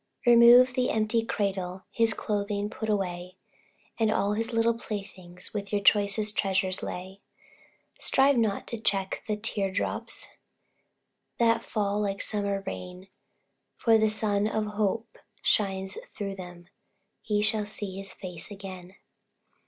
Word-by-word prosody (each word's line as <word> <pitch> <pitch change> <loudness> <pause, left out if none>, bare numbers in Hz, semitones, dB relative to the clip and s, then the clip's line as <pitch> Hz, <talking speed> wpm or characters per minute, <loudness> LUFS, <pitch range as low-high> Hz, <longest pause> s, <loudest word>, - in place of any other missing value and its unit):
Remove 240 +1 +8
the 250 0 +1
empty 220 +1 +1
cradle, 190 -4 -2
His 225 -1 +2
clothing 205 0 -2
put 220 -1 -4
away, 180 -3 -2 0.6
And 220 -1 +3
all 205 -1 +1
his 225 +2 -2
little 230 0 +3
playthings 195 -5 -7
With 200 -2 -4
your 205 - +2
choicest 205 +1 +3
treasures 190 -1 +1
lay; 190 +2 -6 0.8
Strive 275 +1 +3
not 220 -4 +1
to 230 - -4
check 195 -3 0
the 210 -1 -1
tear 210 -2 -1
drops, 195 - -3 1.1
That 230 -1 +3
fall 205 -1 -1
like 200 -1 -1
summer 200 -2 -1
rain, 180 +1 -7 0.7
For 225 -1 +4
the 220 0 +3
sun 210 -1 +1
of 220 0 -1
hope 215 +2 -1 0.2
shines 195 -2 +1 0.2
thro' 200 -1 -3
them 180 -2 -10 0.6
Ye 210 -1 +1
shall 215 -1 +2
see 205 -3 -5
his 195 0 -7
face 180 -2 -8
again. 190 -2 -9
205 Hz, 135 wpm, -28 LUFS, 195-220 Hz, 1.1 s, Remove